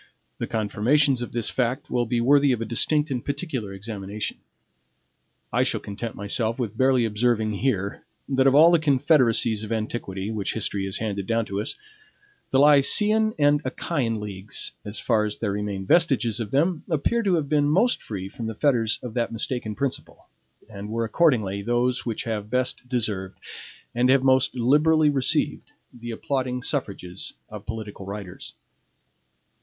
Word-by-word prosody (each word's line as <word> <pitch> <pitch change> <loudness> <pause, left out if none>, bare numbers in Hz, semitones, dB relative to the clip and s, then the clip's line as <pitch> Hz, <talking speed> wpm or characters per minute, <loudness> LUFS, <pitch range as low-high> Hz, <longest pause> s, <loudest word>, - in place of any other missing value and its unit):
The - - -3
confirmations 120 +5 +1
of 120 - -5
this 120 -2 -1
fact 125 0 -2
will 120 -1 0
be 120 +1 0
worthy 140 +3 +4
of 120 - -2
a 115 - -3
distinct 150 +7 +1
and 125 -3 -2
particular 140 - -4
examination. 100 +1 -6 1.1
I - - +3
shall - - +1
content 105 +3 -6
myself 110 +3 -1
with 115 -5 -3
barely 130 -1 +3
observing 110 0 +1
here, 100 -5 -1 0.2
that 135 -1 +2
of 135 - +4
all 160 +3 +8
the 170 - +4
confederacies 130 -7 +3
of 110 - -7
antiquity, 110 -3 -3
which 105 -3 -2
history 100 -3 -1
has 95 - -2
handed 100 -3 -3
down 115 -1 +1
to 100 -1 -3
us, - - -1 0.7
the 135 - +2
Lycian 210 +10 +4
and 145 -1 +3
Achaean 130 -4 -2
leagues, 100 -1 -3
as 105 +1 -5
far 110 - +1
as 105 -1 -3
there 105 -3 -2
remain 100 -1 -3
vestiges 130 - +2
of 110 -3 -4
them, 155 - +1
appear 170 +9 +1
to 195 -5 +2
have 155 -4 -1
been 145 0 +2
most 210 +11 +2
free 95 -3 -6
from 115 +3 -7
the 110 - -5
fetters 115 -5 +1
of 120 -3 -6
that 120 -1 -1
mistaken 115 -1 -2
principle, 140 -2 -5 0.4
and 100 +1 -8
were 115 +1 -1
accordingly 110 - +1
those 120 +3 0
which 115 - -2
have 105 -2 -4
best 125 0 -2
deserved, 105 -7 -2 0.6
and 125 +2 +2
have 135 0 +4
most 130 0 +3
liberally 150 +5 +3
received, 135 -3 0 0.2
the 120 -1 -9
applauding 125 +1 -2
suffrages 100 - -3 0.2
of 105 -1 -10
political 110 -3 -7
writers. 100 -2 -8
120 Hz, 165 wpm, -24 LUFS, 105-140 Hz, 1.1 s, all